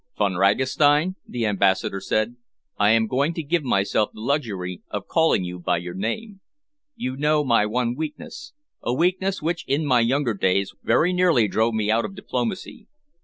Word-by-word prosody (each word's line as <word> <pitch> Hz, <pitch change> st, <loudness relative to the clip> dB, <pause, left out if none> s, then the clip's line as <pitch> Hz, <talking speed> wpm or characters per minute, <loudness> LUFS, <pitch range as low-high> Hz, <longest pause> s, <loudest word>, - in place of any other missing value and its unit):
"Von 100 Hz, -2 st, +1 dB
Ragastein," 140 Hz, -, +3 dB
the 120 Hz, -2 st, -2 dB
Ambassador 100 Hz, -1 st, +1 dB
said, 110 Hz, +4 st, -1 dB, 0.4 s
"I 105 Hz, 0 st, +3 dB
am 110 Hz, 0 st, +4 dB
going 140 Hz, +8 st, 0 dB
to 165 Hz, -, -3 dB
give 165 Hz, +3 st, 0 dB
myself 100 Hz, -3 st, +1 dB
the -, -, -14 dB
luxury 110 Hz, -, -2 dB
of -, -, -4 dB
calling 160 Hz, -, +2 dB
you 90 Hz, 0 st, -6 dB
by 90 Hz, 0 st, 0 dB
your 85 Hz, +1 st, -6 dB
name. 190 Hz, -, -4 dB, 0.5 s
You 130 Hz, +1 st, -4 dB
know 150 Hz, +2 st, +2 dB
my 115 Hz, -6 st, +3 dB
one 120 Hz, +2 st, 0 dB
weakness, 160 Hz, -, -7 dB, 0.3 s
a 120 Hz, -, -1 dB
weakness 185 Hz, +3 st, 0 dB
which 165 Hz, +1 st, -1 dB
in 145 Hz, +3 st, 0 dB
my 130 Hz, -4 st, +3 dB
younger 120 Hz, +1 st, +1 dB
days 95 Hz, 0 st, 0 dB
very 180 Hz, +3 st, +2 dB
nearly 175 Hz, -11 st, +3 dB
drove 110 Hz, +3 st, +1 dB
me 110 Hz, -1 st, 0 dB
out 115 Hz, +1 st, +2 dB
of 195 Hz, -, -6 dB
diplomacy. 195 Hz, 0 st, -4 dB
120 Hz, 170 wpm, -23 LUFS, 105-155 Hz, 0.5 s, am